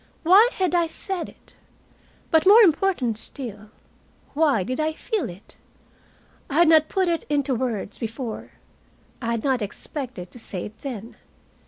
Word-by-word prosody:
Why 390 +8 +7
had 370 -2 0
I 340 -1 +3
said 365 +2 -4
it? - - -21 0.8
But 320 +2 +4
more 440 +4 +9
important 320 - +2
still, 215 -7 -8 0.6
why 285 -9 +2
did 255 +7 -4
I 310 0 0
feel 430 - -3
it? 185 +5 -14 0.9
I 280 - -4
had 340 +1 +5
not 315 -1 +5
put 380 -2 +1
it 335 -2 0
into 285 -2 +1
words 230 -5 -3
before, 230 0 -5 0.7
I 230 - -3
had 230 -1 -1
not 265 -4 +1
expected 210 - -6
to 245 - -12
say 195 -5 -5
it 210 - -11
then. 235 -5 -7
275 Hz, 155 wpm, -24 LUFS, 225-335 Hz, 0.9 s, more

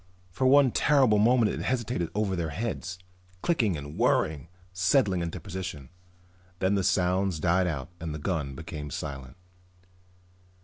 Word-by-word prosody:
For 130 +9 +1
one 135 -1 +6
terrible 130 -8 +4
moment 115 0 +4
it - - -4
hesitated 120 -9 -1
over 105 -3 0
their 85 -3 -2
heads, 95 +1 -4 0.5
clicking 115 - +1
and 70 +1 -8
whirring, 75 0 +1 0.3
settling 95 0 +2
into 85 +2 -4
position. 85 -6 -6 0.7
Then 95 +2 +1
the 100 -1 +1
sounds 90 -1 +1
died 90 +3 +2
out 75 -5 -4
and 80 -1 -5
the 75 - -4
gun 75 -4 -3
became 75 -1 -7
silent. 70 -2 -6
90 Hz, 140 wpm, -28 LUFS, 80-105 Hz, 0.7 s, one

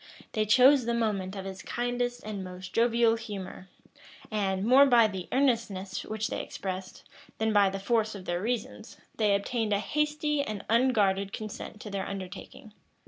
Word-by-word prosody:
They 215 -1 0
chose 255 +3 +6
the 235 0 0
moment 205 -4 -1
of 195 -1 -6
his 190 -1 -7
kindest 245 0 -2
and 210 -3 -5
most 185 0 -9
jovial 230 0 +3
humor; 195 -4 -8 0.6
and, 195 -2 0
more 265 +4 +7
by 235 -4 +6
the 190 -4 -6
earnestness 230 -8 0
which 220 0 -3
they - - -3
expressed, 185 -1 -6 0.3
than 220 0 0
by 200 -2 +5
the 195 - -4
force 220 +2 0
of 190 -2 -9
their 175 0 -2
reasons, 225 0 -4 0.2
they 210 -3 +3
obtained 215 +1 -1
a 200 - +2
hasty 300 +4 0
and 215 -7 -5
unguarded 205 -5 +2
consent 215 0 -7
to 210 - -8
their 195 -1 -3
undertaking. 195 +2 -8
215 Hz, 165 wpm, -28 LUFS, 195-235 Hz, 0.6 s, more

